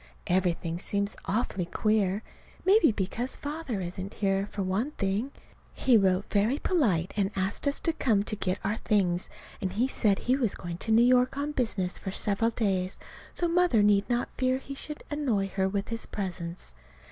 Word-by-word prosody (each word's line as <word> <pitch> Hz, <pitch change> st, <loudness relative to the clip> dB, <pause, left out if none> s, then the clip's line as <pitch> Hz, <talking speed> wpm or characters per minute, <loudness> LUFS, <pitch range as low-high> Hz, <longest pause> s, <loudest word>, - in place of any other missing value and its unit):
Everything 175 Hz, -2 st, 0 dB
seems 200 Hz, +2 st, -1 dB
awfully 195 Hz, -4 st, -1 dB
queer. 210 Hz, +1 st, +1 dB, 0.4 s
Maybe 385 Hz, -, +6 dB
because 220 Hz, +5 st, -2 dB
Father 290 Hz, -8 st, -4 dB
isn't 185 Hz, +2 st, -5 dB
here, 195 Hz, -1 st, 0 dB
for 200 Hz, -, -3 dB
one 195 Hz, +9 st, 0 dB
thing. 200 Hz, +4 st, -1 dB, 0.5 s
He 255 Hz, -, +4 dB
wrote 190 Hz, -2 st, +3 dB
very 215 Hz, +7 st, +2 dB
polite 210 Hz, -, +1 dB
and 200 Hz, -2 st, +1 dB
asked 195 Hz, +8 st, -1 dB
us 285 Hz, -, +1 dB
to 330 Hz, -, +1 dB
come 220 Hz, -9 st, +2 dB
to 215 Hz, -, -2 dB
get 185 Hz, -2 st, -1 dB
our 210 Hz, +3 st, 0 dB
things, 185 Hz, -6 st, +1 dB, 0.3 s
and 185 Hz, -1 st, -2 dB
he 235 Hz, +6 st, +2 dB
said 210 Hz, -6 st, +2 dB
he 255 Hz, -, +1 dB
was 245 Hz, -7 st, 0 dB
going 175 Hz, -1 st, -6 dB
to 225 Hz, -, -1 dB
New 230 Hz, +2 st, +6 dB
York 255 Hz, +2 st, +3 dB
on 290 Hz, +1 st, -1 dB
business 215 Hz, -9 st, -1 dB
for 195 Hz, -, -5 dB
several 210 Hz, +3 st, +1 dB
days, 195 Hz, -5 st, -1 dB, 0.3 s
so 345 Hz, -, 0 dB
Mother 340 Hz, -10 st, +3 dB
need 205 Hz, +1 st, +3 dB
not 240 Hz, 0 st, 0 dB
fear 255 Hz, 0 st, +2 dB
he 275 Hz, +1 st, -8 dB
should 300 Hz, +2 st, -6 dB
annoy 240 Hz, -10 st, 0 dB
her 190 Hz, 0 st, 0 dB
with 200 Hz, 0 st, -2 dB
his 230 Hz, 0 st, -4 dB
presence. 175 Hz, -, -5 dB
205 Hz, 180 wpm, -28 LUFS, 190-250 Hz, 0.5 s, Maybe